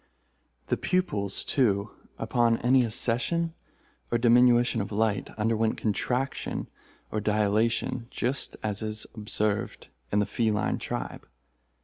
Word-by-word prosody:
The - - 0
pupils, 105 - 0
too, 100 -7 +1 0.3
upon 120 -1 +2
any 125 +1 +4
accession 125 +9 0 0.6
or 120 - +2
diminution 120 0 +4
of 100 - -5
light, 105 -1 0
underwent 110 0 +1
contraction 125 +5 -1 0.4
or 110 - -1
dilation, 110 +3 +1
just 130 +3 -1
such - - -13
as 105 -1 -1
is 110 0 -4
observed 105 -1 -2 0.2
in 100 - +2
the 105 - +3
feline 110 -1 0
tribe. - - -5
115 Hz, 115 wpm, -27 LUFS, 105-120 Hz, 0.6 s, any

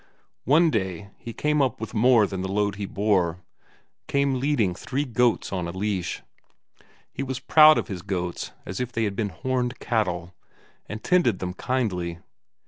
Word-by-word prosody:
One 160 +4 +5
day 100 - -3
he 115 - -7
came 150 +4 +1
up 130 -2 0
with 110 - -6
more 120 -1 +5
than 95 -2 -4
the 95 0 -3
load 100 0 0
he 100 -1 -4
bore; 90 -5 0 0.6
came 140 -3 +1
leading 125 -9 +1
three 135 +10 -3
goats 125 -2 +1
in 90 -3 -2
a - - -4
leash. 95 -1 -3 0.9
He - - -5
was 130 -1 -3
proud 155 +3 +7
of - - -1
his 95 -6 -5
goats 90 -2 -3
as 90 - -5
if 125 -1 -3
they 115 -1 -1
had 100 -2 -1
been 105 -1 -1
horned 125 +8 -2
cattle, 90 -7 -1 0.6
and 110 +2 -6
tended 175 - +3
them 90 0 -4
kindly. 95 -9 -2
110 Hz, 170 wpm, -25 LUFS, 95-130 Hz, 0.9 s, proud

